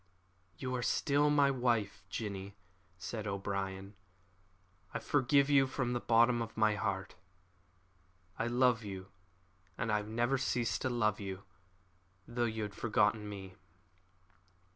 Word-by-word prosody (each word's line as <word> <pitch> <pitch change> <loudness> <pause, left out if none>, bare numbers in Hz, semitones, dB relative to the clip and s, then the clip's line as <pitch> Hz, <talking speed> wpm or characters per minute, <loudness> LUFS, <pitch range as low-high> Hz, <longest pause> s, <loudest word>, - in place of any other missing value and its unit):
"You 130 -1 -3
are 125 - -1
still 145 +4 +2
my 145 -1 +4
wife, 120 -7 0
Jinny," 100 -1 -5 0.4
said 105 +4 -5
O'Brien; 100 0 -3 1.0
"I - - +2
forgive 140 0 +3
you 140 -2 +5
from 130 -2 -1
the 120 - 0
bottom 120 +1 +4
of 115 -1 -6
my 110 -1 +4
heart. 100 -2 -2 1.3
I 115 - 0
love 120 -1 +3
you, 95 -1 -7 0.7
and 115 -3 -1
I 105 - +3
have 105 0 -4
never 120 +4 +1
ceased 120 -3 0
to 130 - 0
love 110 -4 +1
you, 95 -1 -6 0.8
though 120 0 0
you 110 -1 -2
had 105 -1 -5
forgotten 105 0 +1
me." 95 -2 -8
110 Hz, 135 wpm, -34 LUFS, 100-125 Hz, 1.3 s, you